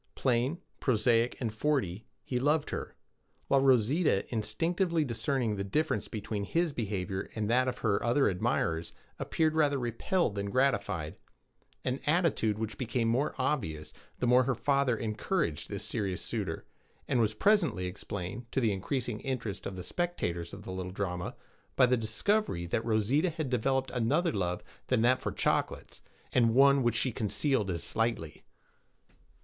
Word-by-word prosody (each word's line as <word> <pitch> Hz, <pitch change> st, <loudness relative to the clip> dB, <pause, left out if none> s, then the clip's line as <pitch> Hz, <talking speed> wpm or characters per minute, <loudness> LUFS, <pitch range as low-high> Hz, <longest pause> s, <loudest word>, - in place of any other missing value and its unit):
Plain, 130 Hz, +5 st, +1 dB, 0.2 s
prosaic, 115 Hz, -1 st, +2 dB
and 115 Hz, -4 st, -2 dB
forty, 110 Hz, -6 st, -1 dB, 0.2 s
he 125 Hz, -, -2 dB
loved 150 Hz, +3 st, +1 dB
her; -, -, -5 dB, 0.5 s
while 135 Hz, -1 st, +4 dB
Rosita, 130 Hz, -, +3 dB
instinctively 165 Hz, -, 0 dB
discerning 120 Hz, -3 st, -1 dB
the 100 Hz, -, -2 dB
difference 150 Hz, +11 st, 0 dB
between 105 Hz, -1 st, -4 dB
his 165 Hz, -, 0 dB
behavior 100 Hz, -5 st, -3 dB
and 110 Hz, -2 st, -1 dB
that 130 Hz, +1 st, +3 dB
of 125 Hz, -1 st, -2 dB
her 100 Hz, -2 st, +2 dB
other 120 Hz, +4 st, +3 dB
admirers, 85 Hz, -3 st, 0 dB, 0.3 s
appeared 160 Hz, -1 st, +1 dB
rather 145 Hz, -3 st, +3 dB
repelled 125 Hz, -, 0 dB
than 100 Hz, 0 st, -3 dB
gratified 105 Hz, -, 0 dB, 0.7 s
an 130 Hz, +2 st, 0 dB
attitude 150 Hz, -, +2 dB
which 110 Hz, -2 st, -4 dB
became 120 Hz, -2 st, 0 dB
more 130 Hz, +6 st, +1 dB
obvious 100 Hz, -, -2 dB, 0.2 s
the -, -, -1 dB
more 125 Hz, +1 st, +5 dB
her 135 Hz, -, +1 dB
father 135 Hz, 0 st, +2 dB
encouraged 110 Hz, -, -2 dB
this 100 Hz, 0 st, -3 dB
serious 100 Hz, -5 st, -2 dB
suitor, 100 Hz, -8 st, -3 dB, 0.4 s
and 125 Hz, -, +2 dB
was 110 Hz, -1 st, +1 dB
presently 165 Hz, -, +3 dB
explained, 100 Hz, +5 st, -6 dB
to -, -, +1 dB
the 115 Hz, -5 st, +2 dB
increasing 115 Hz, +3 st, -2 dB
interest 125 Hz, -8 st, -4 dB
of 95 Hz, -, -6 dB
the 90 Hz, -, -6 dB
spectators 85 Hz, -, -2 dB
of -, -, -9 dB
the -, -, -7 dB
little 95 Hz, 0 st, -4 dB
drama, 90 Hz, -2 st, -3 dB, 0.4 s
by 130 Hz, -, +6 dB
the 125 Hz, 0 st, +3 dB
discovery 115 Hz, -, 0 dB
that 110 Hz, +6 st, -1 dB
Rosita 115 Hz, -, +2 dB
had 155 Hz, -5 st, -4 dB
developed 130 Hz, +2 st, +1 dB
another 140 Hz, +8 st, +1 dB
love 90 Hz, -5 st, -2 dB, 0.2 s
than 125 Hz, -3 st, +2 dB
that 125 Hz, +2 st, +4 dB
for -, -, -2 dB
chocolates, -, -, -1 dB, 0.3 s
and 115 Hz, -2 st, +3 dB
one 140 Hz, +1 st, +6 dB
which 120 Hz, -2 st, +1 dB
she 130 Hz, +3 st, +1 dB
concealed 105 Hz, +1 st, 0 dB
as 85 Hz, -2 st, -2 dB
slightly. 115 Hz, -9 st, -1 dB
120 Hz, 155 wpm, -30 LUFS, 100-135 Hz, 0.7 s, by